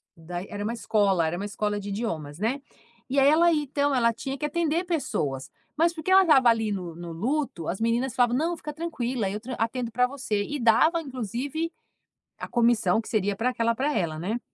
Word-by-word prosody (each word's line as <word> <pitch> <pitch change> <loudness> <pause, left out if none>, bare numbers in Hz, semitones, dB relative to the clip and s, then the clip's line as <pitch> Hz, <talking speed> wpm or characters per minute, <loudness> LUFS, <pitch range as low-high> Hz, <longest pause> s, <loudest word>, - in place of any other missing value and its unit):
da 175 +2 -6
e - - -11
era 205 0 -5
uma 220 +3 -2
escola, 200 -6 +2
era 160 - -2
uma 200 - -4
escola 205 0 -2
de 205 0 -6
idiomas, 165 -8 -4
né. 250 +6 -1 0.5
E, 275 - +2
aí, 275 - +5
ela 335 +3 +5
então 285 -1 0
ela 235 -2 +3
tinha 270 +4 -5
que 300 - -3
atender 335 +3 0
pessoas, 145 - -2 0.3
mas 335 +2 +3
porque 325 +3 -3
ela 385 0 +8
estava 270 -8 +5
ali 225 -2 +2
no 180 -4 -4
no 170 0 -7
luto, 240 - -2
as 190 - -2
meninas 235 +2 0
falavam: 245 -1 +3
"Não, 335 +3 0
fica 300 -1 -7
tranquila, 260 - -2
eu 210 +2 -4
tran 250 +3 -6
atendo 230 +1 -2
para 250 +2 +2
você". 250 -6 -2
E 290 +6 -4
dava, 315 +9 +4
inclusive, 270 - -4 0.7
a - - -6
comissão, 230 -5 +3
que 225 - -10
seria 205 -4 0
para 245 +4 +1
aquela 230 -2 0
para 285 +5 -1
ela, 160 -4 -1
né. 215 +8 -2
235 Hz, 210 wpm, -26 LUFS, 205-285 Hz, 0.7 s, ela